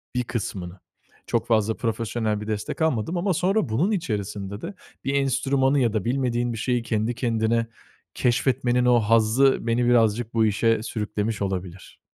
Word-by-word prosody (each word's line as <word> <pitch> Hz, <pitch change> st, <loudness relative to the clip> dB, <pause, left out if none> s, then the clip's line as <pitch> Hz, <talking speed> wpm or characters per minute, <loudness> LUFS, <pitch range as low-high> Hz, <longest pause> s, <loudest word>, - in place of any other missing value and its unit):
bir 125 Hz, -, +1 dB
kısmını. 95 Hz, -6 st, -5 dB, 0.5 s
Çok -, -, -1 dB
fazla 110 Hz, -1 st, +1 dB
profesyonel 115 Hz, -2 st, -2 dB
bir 105 Hz, -, -7 dB
destek 110 Hz, +9 st, -4 dB
almadım 160 Hz, +3 st, 0 dB
ama 185 Hz, +2 st, +1 dB
sonra 180 Hz, -, +1 dB
bunun 150 Hz, -, +1 dB
içerisinde 105 Hz, -, -3 dB
de 190 Hz, -, -6 dB, 0.3 s
bir 135 Hz, -, 0 dB
enstrümanı 135 Hz, +1 st, +2 dB
ya 115 Hz, -4 st, +1 dB
da 110 Hz, -, -1 dB
bilmediğin 120 Hz, -1 st, 0 dB
bir -, -, -5 dB
şeyi 125 Hz, -1 st, 0 dB
kendi 115 Hz, 0 st, -1 dB
kendine 115 Hz, -1 st, 0 dB, 0.5 s
keşfetmenin 125 Hz, 0 st, +1 dB
o 125 Hz, -1 st, +5 dB
hazzı 115 Hz, +5 st, +3 dB
beni 120 Hz, +1 st, +2 dB
birazcık 115 Hz, -1 st, +2 dB
bu 115 Hz, -1 st, +3 dB
işe 110 Hz, +1 st, +1 dB
sürüklemiş 105 Hz, -1 st, -3 dB
olabilir. 95 Hz, -2 st, -5 dB
115 Hz, 155 wpm, -24 LUFS, 110-125 Hz, 0.5 s, o